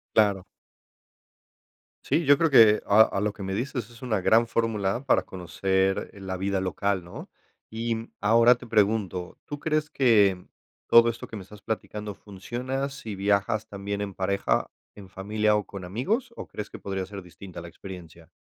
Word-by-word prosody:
Claro. 100 -3 +3 1.6
Sí, 165 - +1
yo 145 +1 +7
creo 165 -1 +3
que 110 -5 +7
a 105 +2 +6
a 100 - -2
lo 105 - 0
que 100 - -9
me 95 0 -3
dices 120 +1 -3
es 115 - -16
una 110 -7 -1
gran 115 +4 +4
fórmula 115 +1 -1
para 135 - +4
conocer, 95 +2 -1
eh, 100 - -13
la 95 -1 -4
vida 95 +1 -1
local, 95 0 -1
¿no? 85 - -10 0.4
Y 115 0 -3
ahora 115 +3 +5
te - - -12
pregunto, 100 -5 0
¿tú 145 0 -6
crees 155 -1 -1
que 105 -10 +3 0.4
todo 115 0 +7
esto 115 - -6
que 110 - -9
me 100 - -7
estás 105 +2 -14
platicando 105 -2 -5
funciona 125 +8 -4
si 135 -7 -7
viajas 100 +2 0
también 100 0 -4
en 100 -2 -5
pareja, 100 +1 0 0.2
en 100 -2 -12
familia 105 +2 0
o 105 -1 -1
con 95 -3 -8
amigos, 215 - -2
o - - -8
crees 105 - -7
que - - -9
podría 95 -1 -3
ser 100 0 -8
distinta 90 +1 -11
a - - -7
la 85 - -9
experiencia? 85 -4 -11
105 Hz, 180 wpm, -26 LUFS, 95-115 Hz, 1.6 s, yo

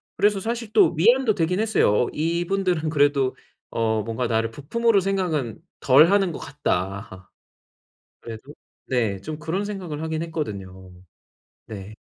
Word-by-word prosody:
그래서 205 -1 +2
사실 230 +1 -4
또 - - +5
위안도 235 +5 +4
되긴 180 +3 0
했어요. 210 - +3
어 - - -5
이분들은 170 0 0
그래도 140 -3 +2 0.3
어 110 -1 0
뭔가 115 +2 -2
나를 115 0 0
부품으로 205 - +1
생각은 175 - -1 0.2
덜 145 +6 +6
하는 195 -3 +3
것 - - -7
같다. 95 -8 -4 0.9
그래도 115 +6 -10 0.3
네, 110 -7 0
좀 155 +4 -6
그런 165 +7 -2
생각을 180 -7 -5
하긴 160 0 -2
했거든요. 95 - -6 0.7
네. 105 0 -8
155 Hz, 285 characters per minute, -23 LUFS, 115-190 Hz, 0.9 s, 덜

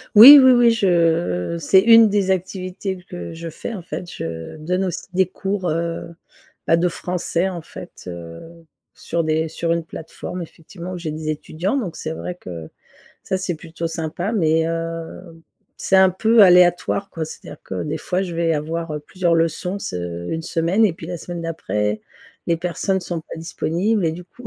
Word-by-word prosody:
Oui, 270 +7 +12
oui, 260 -1 +7
oui 240 -1 +5
je 170 - +1
c'est 175 +5 +5
une 225 +1 +7
des 200 -2 +1
activités 185 0 -3
que 85 -1 -7
je 165 0 -7
fais 165 +8 -6
en 200 - -6
fait, 175 +1 -7
je 80 - -6
donne 180 +5 -1
aussi 180 -2 -4
des 190 +1 +3
cours, 190 0 -3
heu 165 +1 -3 0.5
bah, 165 - +4
de 175 +1 +2
français 180 +1 -2
en 175 -3 -6
fait, - - -11
heu, 85 - -10 0.3
sur 170 0 -3
des 160 0 0
sur 165 +2 -2
une 170 0 -2
plateforme 165 +2 -8
effectivement 170 +2 -9
où - - -5
j'ai 165 -3 -4
des 155 0 -5
étudiants 160 - -2
donc 200 -11 -3
c'est 155 - -4
vrai 180 +2 -6
que 85 - -9 0.5
ça 190 - -1
c'est 185 -1 -2
plutôt 165 +1 -6
sympa. 165 +4 -3
Mais 160 -6 +2
heu, 165 0 -5 0.4
c'est 190 - +1
un 190 0 +6
peu 220 +4 +4
aléatoire 180 +1 +4
quoi. 165 - -4
C'est-à-dire 155 - -10
que - - -5
des 155 +1 -3
fois 180 +3 -1
je 180 -3 -5
vais 165 -1 +1
avoir, 160 +2 -3
heu, 150 - -3
plusieurs 170 +3 0
leçons 165 +4 0
se 85 - -5
une 160 0 -3
semaine 170 +7 +1
et 205 - +3
puis 165 0 -10
la 175 +1 -4
semaine 175 +1 -7
d'après 105 - -2 0.5
les 170 - +2
personnes 180 +3 -1
sont 175 -2 -4
pas 160 - -10
disponibles 175 +5 -1
et 160 - 0
du 175 +2 -9
coup 235 +7 -14
170 Hz, 185 wpm, -21 LUFS, 160-185 Hz, 0.5 s, Oui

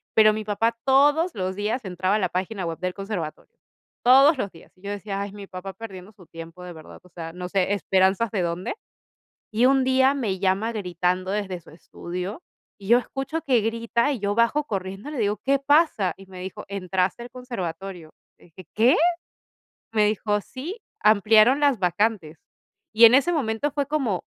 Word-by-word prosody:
Pero 215 -1 +6
mi 215 0 -4
papá 225 +3 0
todos 290 +5 +3
los 185 -1 -3
días 215 +3 -2
entraba 185 +2 0
a - - +1
la 185 -3 0
página 185 +1 -3
web 165 -1 -4
del 185 0 -2
conservatorio. 195 -6 -6 0.5
Todos 270 +4 +6
los 200 - -2
días. 165 - -17
Y - - -25
yo 200 - -5
decía: 200 -1 -4
"Ay, 200 0 -5
mi 200 -1 -9
papá 190 +1 -8
perdiendo 200 -2 -10
su 185 -4 -18
tiempo 165 +2 -10
de 180 -1 -8
verdad, 160 -1 -13
o 180 - -19
sea, 165 -1 -8
no 180 0 -6
sé, 195 0 +1
¿esperanzas 195 +2 +2
de 200 -4 -1
dónde?". 170 - -3 0.8
Y 230 +4 +2
un 270 -1 +3
día 260 +1 +3
me 210 -8 -2
llama 195 +4 +1
gritando 180 -1 -1
desde 195 -4 -3
su - - -17
estudio, 180 - -7 0.4
y 195 - -11
yo 240 - +7
escucho 270 +6 -4
que 250 -6 +2
grita, 230 +4 0
y 245 - -5
yo 205 0 -1
bajo 255 +6 +2
corriendo, 195 +5 -5
y - - -7
le 260 - -4
digo: 210 -1 0
"¿Qué 275 0 +3
pasa?". 285 - +2
Y 195 - -13
me 185 -1 -11
dijo: 190 - -7
"Entraste 190 +2 -2
al 245 - -10
conservatorio". 195 -8 -6 0.3
Le - - -20
dije: 175 +1 -14
"¿Qué?". 235 +5 +5 1.0
Me 210 -1 +3
dijo: 210 0 0
"Sí, 315 - -8 0.2
ampliaron 215 +5 +5
las 280 -6 +3
vacantes". 180 -3 0 0.6
Y 230 +2 +7
en 235 - +6
ese 280 +6 +4
momento 270 -1 -1
fue 285 -2 -1
como, 270 -11 -1
205 Hz, 190 wpm, -24 LUFS, 185-245 Hz, 1.0 s, yo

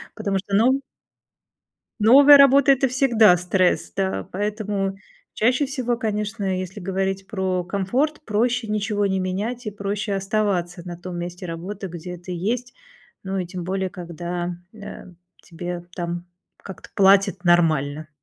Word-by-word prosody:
потому 200 -3 -1
что 195 +1 -3
нов 255 +6 +4 1.2
новая 275 +6 +8
работа- 275 0 +6
это 270 0 +3
всегда 240 -7 +4
стресс. 180 - +1
Да. 95 0 -2
Поэтому 205 -1 -2 0.4
чаще 250 +6 +2
всего, 255 -3 -2
конечно, 210 -3 -2
если 185 +2 -6
говорить 190 +1 -2
про 190 -3 -1
комфорт, 245 - -1
проще 230 +2 0
ничего 210 -1 -1
не 190 -1 0
менять 210 +7 -3
и 210 - -3
проще 205 +1 -3
оставаться 195 -3 -1
на 175 - -6
том 180 0 -7
месте 175 +1 -6
работы, 185 +4 -6
где 175 +1 -8
ты 175 +1 -9
есть, 230 +8 -2 0.5
ну 195 0 -3
и 185 - -2
тем 180 0 -7
более, 190 0 -2
когда, 175 0 -5 0.2
э, 205 -3 -10 0.3
тебе 175 0 -6
там 175 0 -4 0.3
как-то 190 - -11
платят 195 -1 +4
нормально. 155 -3 +2
195 Hz, 140 wpm, -23 LUFS, 180-215 Hz, 1.2 s, новая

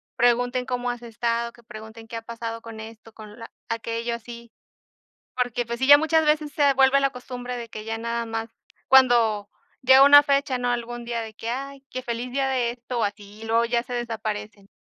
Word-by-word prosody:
pregunten: 245 +1 +2
"¿Cómo 245 -1 -2
has 240 0 -8
estado?", 235 0 -2
que 240 - -19
pregunten: 220 +1 -11
"¿Qué 230 - -8
ha 230 - -4
pasado 230 0 -6
con 225 -1 -10
esto, 225 0 -11
con 215 -1 -12 0.3
aquello?", 230 0 -3
así. 235 0 -11 0.8
Porque, 245 -1 -1
pues, 235 +1 -5
sí, 265 - 0
ya 290 0 +10
muchas 320 +1 +2
veces 300 -1 +1
se 285 -2 +3
vuelve 270 +1 +4
la 275 -1 +2
costumbre 250 0 -7
de 235 -1 -7
que 215 0 -8
ya 225 0 -3
nada 235 +1 -3
más 225 0 -4 0.4
cuando 235 -6 +4 0.3
llega 260 +1 +7
una 290 +1 +9
fecha, 280 -2 +1
¿no?, 245 - -1
algún 240 0 -4
día 235 -1 -2
de 220 - -8
que, 225 - -7
ay, 275 +2 -5
qué: 255 - -5
"Feliz 240 0 -4
día 270 0 0
de 245 -3 0
esto", 245 0 -6
o - - +2
así, 205 +1 -6
luego 230 +1 +2
ya 235 0 0
se 245 - -7
desaparecen. 215 -3 -5
235 Hz, 205 wpm, -24 LUFS, 225-255 Hz, 0.8 s, ya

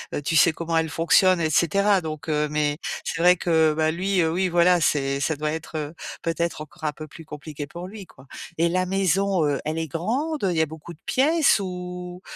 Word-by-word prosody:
Heu, - - -2
tu 160 +3 0
sais 165 +2 +5
comment 165 0 -2
elle 160 0 +1
fonctionne 170 +2 +3
et 160 - +1
cetera, 200 +6 +3
donc 155 -3 -6
heu 150 0 +1
mais 150 -1 0 0.3
c'est 165 - -3
vrai 180 +1 +6
que 160 -3 +2
bah 155 0 +1
lui, 185 +3 0
heu 160 -1 +1
oui 185 +3 +1
voilà, 175 0 +4
c'est 140 -3 +1
ça 155 +3 0
doit 150 +1 -2
être, 160 +1 -6
heu, 150 0 -4 0.3
peut-être 165 -1 -2
encore 155 +1 -9
un 150 - 0
peu 155 - -8
plus 165 +3 -12
compliqué 150 -1 -8
pour 170 +4 -8
lui 200 +1 -9
quoi. 135 -5 -19 0.3
Et 170 +1 +2
la 185 +1 0
maison, 195 -1 +1
heu, 145 -2 0
elle 155 +1 -2
est 165 0 -2
grande? 250 - -2
Heu, 185 - +1
il 170 - -2
y - - +4
a - - +3
beaucoup 160 +2 -10
de 155 - -20
pièces? 300 0 +3
Ou, 180 -1 -6
165 Hz, 235 wpm, -24 LUFS, 155-180 Hz, 0.3 s, vrai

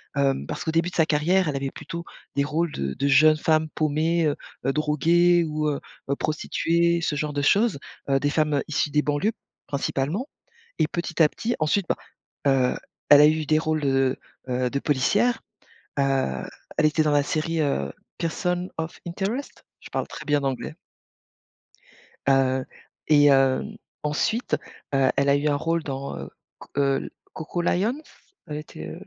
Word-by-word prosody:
hem, 135 -1 +1
parce - - -5
qu'au 160 - -2
début 165 +2 +1
de - - -11
sa 160 -1 +3
carrière 170 +4 +2
elle 140 - -2
avait 135 0 -2
plutôt 170 0 -7 0.3
des 140 - +2
rôles 155 +3 -1
de 70 -1 -3
de 140 - -1
jeunes 155 +3 +6
femmes 155 0 +2
paumées, 155 +2 +1
heu 145 - +1 0.3
heu, 135 - +2
droguées 170 +3 +3
ou 155 -1 -1
heu 140 - -2 0.3
heu, 140 - +2
prostituées, 170 +2 +1
ce 150 - -1
genre 150 0 -2
de 145 - -1
choses, 200 +1 +3 0.3
heu, 135 0 +3
des 145 - +1
femmes 150 -1 +1
issues 150 -1 0
des 150 - +3
banlieues 150 +10 0 0.4
principalement 145 - -2 0.5
et 155 -1 +2
petit 170 -1 0
à 150 - +6
petit 235 +8 -3
ensuite, 165 +4 +1
bah, - - +1 0.5
heu, 130 -2 +3 0.4
elle 145 0 +10
a 150 - +9
eu 155 0 +2
des 155 +1 +3
rôles 155 -1 -1
de, 135 -1 +2 0.3
heu, 125 0 0
de 140 - -1
policières. 205 - +1 0.6
Heu, 135 - 0 0.3
elle 155 - +5
était 155 +1 +2
dans 150 - +1
la 145 -1 +3
série, 160 +1 -1
heu, 70 - 0 0.3
Person 180 +2 -1
of 160 0 -4
Interest, 200 +10 -4 0.2
je - - -13
parle - - -2
très - - -9
bien 145 -1 +2
l'anglais. 135 -2 -3 1.5
Heu, 130 -1 +3 0.4
et 145 -1 +6
hem, 135 -1 +2 0.3
ensuite, 220 +11 0 0.4
heu, 135 -1 +4
elle 140 0 +2
a 140 - +5
eu 145 +1 0
un 145 - +2
rôle 165 +2 -1
dans, 135 0 -5
heu, - - -7 0.3
C - - -12
heu, 140 -1 +1 0.2
Coco 175 +2 -4
Lions? 220 - 0 0.5
Elle 150 -1 -4
était, 115 - -8
heu, - - -7
150 Hz, 175 wpm, -25 LUFS, 140-165 Hz, 1.5 s, elle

